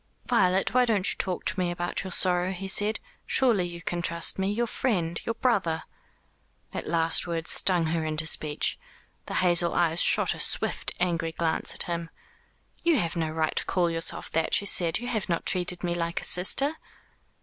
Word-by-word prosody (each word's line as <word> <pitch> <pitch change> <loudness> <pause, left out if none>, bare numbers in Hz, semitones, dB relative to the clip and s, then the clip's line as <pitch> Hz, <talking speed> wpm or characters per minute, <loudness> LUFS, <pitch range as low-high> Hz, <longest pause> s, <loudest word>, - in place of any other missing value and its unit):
"Violet, 190 -5 +1
why 250 0 +4
don't 210 -5 +2
you - - -2
talk 185 -2 0
to 190 - +1
me 180 -1 0
about 175 0 -3
your 190 - -6
sorrow?" 180 0 +1
he 190 +1 -7
said. 205 +3 0 0.3
"Surely 230 -9 +3
you 170 -1 -8
can 175 0 -3
trust 170 +2 0
me 190 +1 0
your 235 +3 -1
friend 180 -9 -2
your 230 - -1
brother!" 190 -10 0 0.9
That - - -6
last 165 +1 +2
word 165 -1 -4
stung 180 -3 +3
her 160 0 -1
into 155 0 -2
speech. 150 -2 0 0.5
The - - -5
hazel 175 -1 +1
eyes 170 -1 +1
shot - - +5
a - - -10
swift - - +1
angry 170 -2 -1
glance 160 0 0
at - - +1
him. 170 -1 -5 0.7
"You 335 -3 +2
have 170 -6 -1
no 165 -2 -2
right 155 0 -2
to - - +2
call 175 -2 0
yourself 165 0 0
that," 160 - +2
she 200 - +1
said, 170 -4 +2
"you 245 - -7
have 220 -6 -3
not 170 - -2
treated 180 -1 +2
me 175 -1 -1
like 170 0 -3
a - - -10
sister." 275 - +1
175 Hz, 195 wpm, -26 LUFS, 165-195 Hz, 0.9 s, shot